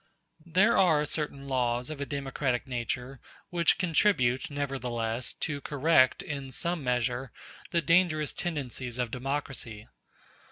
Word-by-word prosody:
There 190 +7 +4
are 160 -6 +4
certain 145 -2 -3
laws 125 0 0
of 145 -2 -6
a 140 - -3
democratic 135 -3 -2
nature 125 +1 -4 0.3
which 170 -2 +3
contribute, 155 -8 +2
nevertheless, 125 -5 -2
to 145 -2 -4
correct, 145 -2 +3
in 140 -2 -5
some 170 +4 -1
measure, 125 0 -1 0.4
the 170 -1 +1
dangerous 160 -2 +3
tendencies 130 -7 -4
of 125 -2 -1
democracy. 130 -4 -4
135 Hz, 120 wpm, -29 LUFS, 125-155 Hz, 0.4 s, There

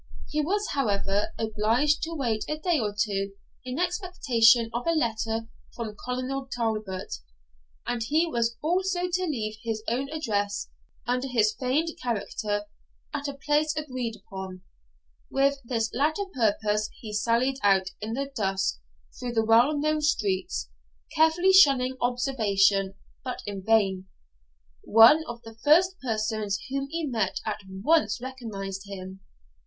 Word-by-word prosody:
He 305 - 0
was, 405 +7 -1
however, 205 -1 0
obliged 225 +7 +1
to 330 +1 -3
wait 235 -7 -1
a 305 - -1
day 335 0 +1
or 210 -3 -1
two 195 -2 0 0.3
in 255 +1 -5
expectation 260 - +3
of 240 +6 -3
a 335 - +3
letter 225 -4 -1 0.3
from 220 -3 -5
Colonel 255 +2 -3
Talbot, 215 -5 -3 0.7
and 240 -1 -2
he 310 +8 +2
was 235 -6 -1
also 360 +3 +1
to 370 +1 +1
leave 220 -9 -3
his 225 -2 -3
own 260 +4 -1
address, 205 -10 -2 0.3
under 250 +2 0
his 220 -4 +2
feigned 265 +8 0
character, 210 -3 -2 0.5
at 290 -1 -3
a 280 - -5
place 295 +2 +1
agreed 255 -7 -3
upon. 190 -2 -9 0.7
With 275 +1 +2
this 230 -2 -1
latter 310 - +1
purpose 215 -2 +1
he 215 -2 -8
sallied 235 +5 +1
out 190 -2 +3
in 220 +2 -3
the 275 +3 -3
dusk 195 - 0 0.4
through 245 -1 -4
the 225 -1 +2
well 240 +7 +5
known 305 +1 +1
streets, 200 - 0 0.5
carefully 330 +4 +4
shunning 270 -8 +6
observation, 205 -6 +2 0.3
but 255 -1 -5
in 200 -2 -5
vain: 195 -3 +2 0.8
one 230 +9 +7
of 240 0 -7
the 225 0 -12
first 360 +5 +5
persons 215 -4 -1
whom 275 0 -1
he 330 +1 -2
met 225 -8 -1
at - - -2
once 210 +4 +2
recognised 210 -7 -6
him. 190 -1 -8
235 Hz, 140 wpm, -27 LUFS, 210-285 Hz, 0.8 s, one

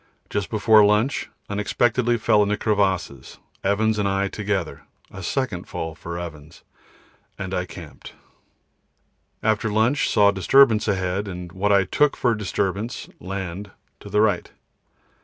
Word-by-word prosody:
Just 100 -2 -2
before 110 0 +5
lunch 105 +6 +1 0.2
unexpectedly 120 +4 +1
fell 110 -2 +3
into 105 0 +1
crevasses, 95 - -1 0.3
Evans 105 +2 +1
and 100 - +1
I 100 0 0
together 100 -5 -3 0.3
a - - -9
second - - -2
fall 80 0 -5
for 85 +1 -7
Evans, 80 -2 -9 0.7
and 95 -1 -5
I 90 -1 -1
camped. - - -11 1.3
After 110 0 +1
lunch 115 +7 +2
saw 100 -1 +5
disturbance 110 +3 +4
ahead, 95 0 -1
and 90 -2 -7
what 100 +3 0
I 100 -1 +5
took 145 +10 +1
for 120 -2 +2
disturbance 105 +3 -3
(land) 95 +1 -5 0.3
to 100 - -11
the 105 +1 +2
right. 110 -1 +1
100 Hz, 135 wpm, -23 LUFS, 95-110 Hz, 1.3 s, before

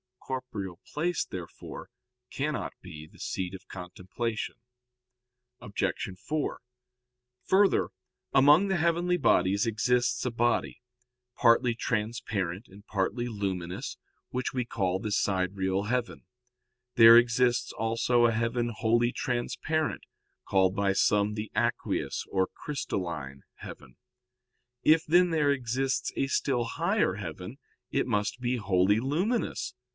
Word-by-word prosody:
Corporeal 110 -9 -5
place, 175 +2 0
therefore, 90 -3 -8 0.4
cannot 150 +2 -2
be 80 -4 -10
the - - -20
seat 95 -1 -3
of 95 - -10
contemplation. 95 +5 -5 1.0
Obj. 100 - -5 0.3
4: 150 +10 -3 0.8
Further, 195 +1 +3 0.4
among 145 +8 +6
the 190 - +1
heavenly 170 +2 +1
bodies 100 - +3
exists 125 +3 +1
a 125 - 0
body, 120 +1 0 0.5
partly 115 0 +4
transparent 110 -4 -2
and 100 +2 -16
partly 110 +5 -1
luminous, 95 -5 -4 0.3
which 125 0 -3
we 125 -1 0
call 95 -5 -1
the 105 +1 -4
sidereal 95 0 0
heaven. 120 +2 -2 0.7
There 115 0 +10
exists 120 +1 +2
also 115 +2 +2
a 115 - +4
heaven 115 +1 0
wholly 120 +2 +2
transparent, 145 +6 -2 0.4
called 95 -1 +3
by 100 -1 +1
some 105 +1 +2
the 105 0 -5
aqueous - - -1
or 95 -1 +2
crystalline 85 - -5
heaven. 65 -2 -11 0.8
If, 160 +1 +4
then, 175 +3 +4
there 155 -3 +2
exists 130 0 -1
a 135 - 0
still 135 -2 0
higher 165 - 0
heaven, 90 - -7 0.3
it 135 - 0
must 105 +1 -1
be 125 0 0
wholly 100 -1 +2
luminous. 175 - -1
115 Hz, 115 wpm, -28 LUFS, 95-130 Hz, 1.0 s, There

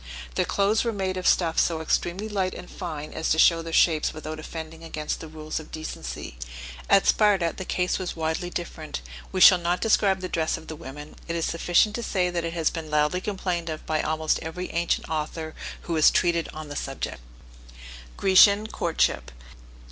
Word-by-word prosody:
Their - - +1
clothes 205 +2 +2
were 235 - 0
made 190 -3 -2
of 185 -1 -2
stuffs 165 -3 +3
so 165 -2 0
extremely 175 +5 -1
light 195 -3 -1
and 180 - -9
fine 155 -5 -6
as - - -2
to 160 - +3
show 165 +1 +5
their 165 0 -7
shapes 160 -2 +3
without 155 0 -6
offending 160 +1 -8
against 155 -2 -4
the 160 - -8
rules 155 0 -5
of 160 - -12
decency. 155 - -6 0.5
At 195 - +5
Sparta, 195 -6 +3
the 190 - -6
case 180 +1 0
was 185 - -4
widely 160 +2 -2
different; 160 - -5 0.3
we 185 - -2
shall 180 -1 +9
not 175 +1 0
describe 200 -4 +2
the 185 - -3
dress 160 -3 -1
of - - -12
the 160 - -5
women; 150 -1 -10
it 170 - -2
is 165 - 0
sufficient 175 +5 +2
to - - -3
say 185 -5 0
that 170 -1 -2
it 165 0 -3
has 165 -2 +1
been 160 -2 -6
loudly 150 +4 +1
complained 180 -4 -2
of 155 -1 -6
by 155 -1 0
almost 155 0 0
every 180 +3 -5
ancient 170 0 0
author 155 0 -3 0.3
who 170 - -4
has 155 -2 +6
treated 170 -2 +1
on 155 0 -8
the 145 - -7
subject. 135 -1 -4 1.0
GRECIAN 200 +2 +6
COURTSHIP. 170 -1 0
165 Hz, 195 wpm, -25 LUFS, 155-185 Hz, 1.0 s, shall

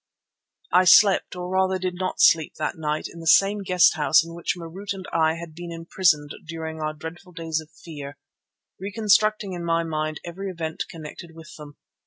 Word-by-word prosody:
I 180 +1 +5
slept, 195 0 +5
or 180 0 -5
rather 190 0 +1
did 185 0 -3
not 185 +1 -4
sleep, 160 -2 +4
that 155 - -3
night 155 -1 -3
in 170 - -12
the 165 - -7
same 200 +5 +5
guest 180 -2 +4
house 150 0 +3
in 165 - -10
which 170 +1 -2
Marût 180 +4 -6
and 190 -1 -9
I 160 -1 +2
had 170 -1 -9
been 175 +1 -8
imprisoned 165 -3 +1 0.2
during 160 -1 -6
our 155 0 -3
dreadful 175 +4 -10
days 165 -2 -2
of 155 - -16
fear, 145 -2 -10 0.6
reconstructing 205 0 +1
in 175 -1 -5
my 165 0 +1
mind 155 -1 -3
every 190 +3 -6
event 165 -3 -4
connected 165 +1 -10
with 165 -1 -12
them. 150 -1 -12
170 Hz, 185 wpm, -24 LUFS, 160-185 Hz, 0.6 s, I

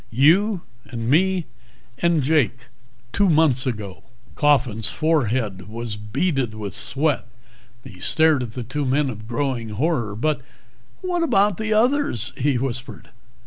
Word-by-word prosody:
You, 170 - +3 0.2
and 115 -2 -5
me 185 +2 +2 0.5
and 170 -4 +2
Jake. 140 -4 +2 0.6
Two 200 -1 +3
months 150 -5 +3
ago." 105 -6 -5 0.3
Coffin's 130 -7 +3
forehead 120 - 0
was 115 -1 -5
beaded 120 - -1
with 105 -3 -6
sweat. 135 +3 0 0.6
He 90 - -12
stared 155 - +3
at 120 -3 -6
the 125 - -4
two 145 +6 -3
men 135 +1 +1
in 110 - -8
growing 120 -2 -2
horror. 115 -2 -1
"But 145 +5 -1 0.6
what 360 -2 -1
about 205 - +2
the 220 0 -3
others?" 240 - +1
he 135 0 +1
whispered. 130 -2 -5
135 Hz, 135 wpm, -22 LUFS, 115-160 Hz, 0.6 s, You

